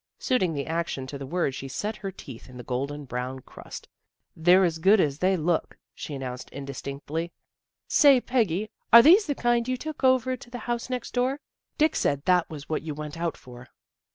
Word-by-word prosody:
Suiting 250 - +1
the 140 -1 -3
action 165 -5 -3
to 140 +1 -7
the 135 - -6
word 170 -3 -1
she 135 - -6
set 205 +11 -3
her 195 -2 -5
teeth 130 -10 -11
in 125 - -12
the 125 - -8
golden 140 +4 -4
brown 125 +1 -4
crust. - - -11 0.3
" - - -55
They're 180 +4 +5
as 165 -3 0
good 195 +6 +5
as 145 -4 +1
they 190 +1 +2
look," 165 0 -1 0.2
she 145 - -7
announced 125 -2 -6
indistinctly. 140 +4 -5 0.3
" - - -65
Say, 280 -4 +6
Peggy, 215 -5 0 0.2
are 235 0 +10
these 370 +7 +6
the 285 - -1
kind 240 -1 +1
you 255 0 -1
took 310 +2 -7
over 260 0 +3
to 250 -1 -14
the 245 - -6
house 240 0 -3
next 250 -2 -4
door? 255 +3 0 0.4
Dick 310 0 +3
said 140 0 0
that 180 -2 +3
was 150 -2 -9
what 155 - -2
you 155 -2 -6
went 150 0 -6
out 165 0 -3
for." 125 -1 -13
170 Hz, 210 wpm, -26 LUFS, -, 0.4 s, are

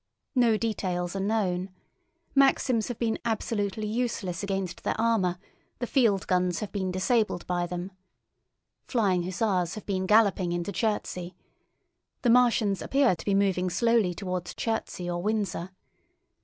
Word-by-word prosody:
No 240 -5 +4
details 185 -5 -2
are - - -1
known. 195 -3 0 0.6
Maxims 265 -4 +3
have 245 - -4
been 225 -2 -1
absolutely 215 -2 -1
useless 210 -6 -2
against 195 -2 -3
their - - -1
armour; 215 -6 +2 0.4
the 245 - -2
field 225 -7 +2
guns 180 -2 +1
have 210 - -5
been 190 -2 -2
disabled 195 +1 0
by 175 -1 -1
them. 180 +2 -5 1.0
Flying 200 -8 +2
hussars 185 -1 0
have 215 - -8
been 190 -2 -1
galloping 200 -4 +4
into 175 +3 -2
Chertsey. 185 -5 -2 0.9
The 240 - +4
Martians 230 -5 +3
appear 270 -8 +3
to - - -11
be 200 - +2
moving 190 -2 +2
slowly 230 -3 +2
towards 180 -2 -4
Chertsey 220 -5 -3
or 175 0 -2
Windsor. 205 -3 -1
200 Hz, 140 wpm, -27 LUFS, 180-225 Hz, 1.0 s, No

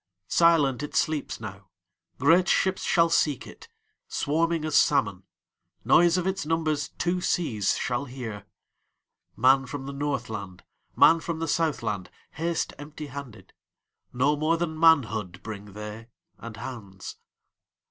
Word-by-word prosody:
Silent 155 -6 +4
it 150 - -6
sleeps 155 -3 -1
now; 100 -3 -9 0.5
Great 170 +6 +4
ships 190 0 +2
shall 170 -2 +3
seek 150 -4 +1
it, - - -13 0.4
Swarming 165 +1 0
as 155 - -3
salmon; 115 -11 +3 0.6
Noise 175 +1 +5
of 180 - -1
its 190 +1 -1
numbersTwo 165 +3 -1
seas 115 - 0
shall 125 +3 -2
hear. 115 -6 -7 0.9
Man 135 +1 +4
from 135 0 -6
the 140 - -6
Northland, 110 -10 -4 0.3
Man 165 - +6
from 165 0 -4
the 165 0 -3
Southland, 115 - -1 0.2
Haste 165 +1 -2
empty 150 +1 -8
handed; 120 -9 -9 0.6
No 140 +4 +2
more 155 +3 +1
than 165 -1 -2
manhoodBring 110 - +1
they, 105 +2 -8 0.3
and 115 -1 -9
hands. 110 -6 -8
145 Hz, 125 wpm, -26 LUFS, 110-165 Hz, 0.9 s, Man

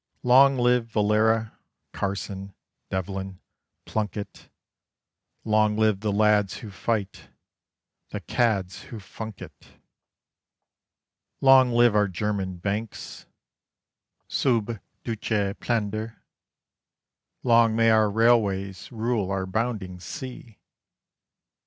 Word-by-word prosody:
Long 135 +2 +6
live 125 -1 +2
Valera, 110 +1 +1 0.3
Carson, 100 0 -4 0.3
Devlin, 95 0 -4 0.5
Plunkett! 105 -1 -5 1.0
Long 110 -1 +2
live 110 -3 +2
the 105 0 -1
lads 105 -1 +2
who 110 -4 -9
fight, 100 0 -3 0.8
the - - -5
cads 100 -6 -1
who 115 - -8
funk 105 +1 -8
it! - - -16 1.6
Long 135 -2 +6
live 120 -2 +4
our 105 -1 +4
German 95 -1 -3
banks, 100 +5 -5 1.0
sub 115 -4 0 0.2
duce 105 -3 -1
Plender! 110 -1 -3 1.2
Long 115 -2 +4
may 115 0 +4
our 110 -1 +4
railways 100 -4 +1
rule 115 -4 -1
our 95 -1 -1
bounding 100 -3 -3
sea! 125 +1 -8
110 Hz, 90 wpm, -25 LUFS, 100-115 Hz, 1.6 s, Long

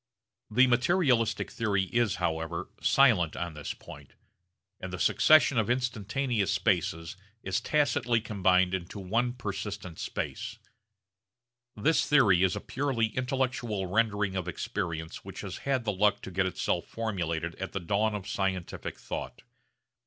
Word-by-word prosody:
The 125 +4 +5
materialistic 125 - +2
theory 100 -4 0
is 110 +1 +1
however 80 -2 -2
silent 110 - +4
on 85 -2 -4
this 75 -1 -5
point; - - -13 0.6
and 95 - -6
the 90 - -4
succession 150 - +5
of 110 - 0
instantaneous 120 -3 0
spaces 85 -3 0 0.3
is 95 0 -1
tacitly 130 -6 +2
combined 95 -4 +2
into 95 +2 -4
one 115 +6 0
persistent 100 -5 -5
space. - - -4 1.2
This 145 +7 +2
theory 110 -12 +5
is 95 -1 +3
a - - -4
purely 120 -5 -1
intellectual 125 -5 -1
rendering 100 0 +1
of 90 -2 -2
experience 85 -5 -4
which - - -8
has - - -6
had 130 -3 +1
the 105 - 0
luck 100 +1 +2
to - - -7
get 95 +1 +1
itself 90 - -1
formulated 85 -7 -2
at 95 - -5
the 95 - -1
dawn 105 +5 0
of 100 -2 -6
scientific 95 -2 -3
thought. - - -6
105 Hz, 140 wpm, -29 LUFS, 95-120 Hz, 1.2 s, The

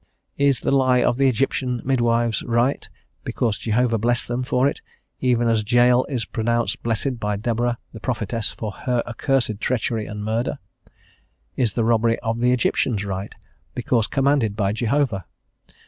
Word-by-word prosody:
Is 140 -3 +3
the - - 0
lie 130 -2 +3
of 120 - +1
the 135 0 +4
Egyptian 125 0 -1
midwives 120 -3 +1
right, 120 +3 +1 0.3
because 110 -4 -1
Jehovah 115 0 +1
blessed 120 +2 0
them 120 +1 -1
for 125 +1 +2
it, 140 - -3 0.4
even 120 -2 +2
as 115 -2 +2
Jael 120 +1 +5
is 125 -6 -3
pronounced 115 0 -1
blessed 115 +2 -1
by 105 -1 -1
Deborah, 120 +3 -1 0.2
the 110 - -8
prophetess, 115 -2 -2
for 110 -2 -5
her 125 +4 -1
accursed 120 -2 -1
treachery 115 -2 -1
and 105 0 -6
murder? 115 +6 -1 1.0
Is 120 -4 0
the 115 - 0
robbery 115 0 +2
of 115 0 -2
the 125 +1 +3
Egyptians 120 -4 +1
right, 95 0 -5 0.4
because 120 -2 +1
commanded 135 -6 +1
by 100 -2 0
Jehovah? 115 - 0
120 Hz, 155 wpm, -22 LUFS, 110-125 Hz, 1.0 s, Jael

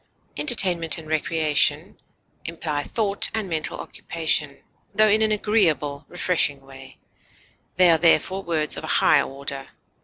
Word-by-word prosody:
Entertainment 180 - +3
and 160 -1 -10
recreation 155 -1 0 0.4
imply 160 -3 -4
thought 200 +4 0
and 220 -3 -3
mental 160 -3 -3
occupation, 155 -3 -3 0.3
tho 215 0 +4
in 215 +1 +2
an 220 -1 +2
agreeable, 165 -9 0
refreshing 170 -6 0
way; 135 0 -15 0.8
they 180 -1 +5
are 165 - +2
therefore 185 +3 +2
words 160 -4 -2
of - - -7
a - - -6
high - - +4
order. 135 0 -7
165 Hz, 130 wpm, -22 LUFS, 145-190 Hz, 0.8 s, they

